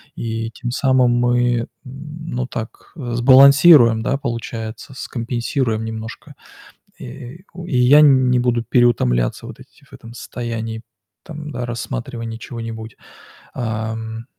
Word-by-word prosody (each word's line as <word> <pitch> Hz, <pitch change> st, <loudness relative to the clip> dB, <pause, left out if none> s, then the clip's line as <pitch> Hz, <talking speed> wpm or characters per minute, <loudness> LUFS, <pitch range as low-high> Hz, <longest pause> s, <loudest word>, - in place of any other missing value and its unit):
И 115 Hz, 0 st, -4 dB
тем 120 Hz, +1 st, -6 dB
самым 130 Hz, -2 st, +2 dB
мы, 120 Hz, 0 st, +2 dB
м, 115 Hz, -, -4 dB, 0.2 s
ну 145 Hz, 0 st, -6 dB
так 110 Hz, -3 st, -8 dB
сбалансируем, 130 Hz, -1 st, +6 dB
да, 130 Hz, +3 st, 0 dB
получается, 115 Hz, -1 st, -6 dB
скомпенсируем 120 Hz, -2 st, -3 dB
немножко. 110 Hz, 0 st, -8 dB, 0.6 s
И 130 Hz, +6 st, -10 dB, 0.3 s
я 130 Hz, +5 st, +6 dB
не 130 Hz, -4 st, +4 dB
буду 120 Hz, -1 st, 0 dB
переутомляться 105 Hz, -, +1 dB
вот -, -, -11 dB
эти -, -, -19 dB
в -, -, -28 dB
этом 115 Hz, 0 st, -12 dB
состоянии 115 Hz, 0 st, -5 dB, 0.4 s
там, 150 Hz, -2 st, -8 dB
да, 125 Hz, -2 st, -4 dB
рассматривания 120 Hz, -1 st, -5 dB
чего-нибудь. 115 Hz, -2 st, -7 dB, 0.6 s
Ам, 110 Hz, -1 st, -4 dB
120 Hz, 115 wpm, -19 LUFS, 115-130 Hz, 0.6 s, сбалансируем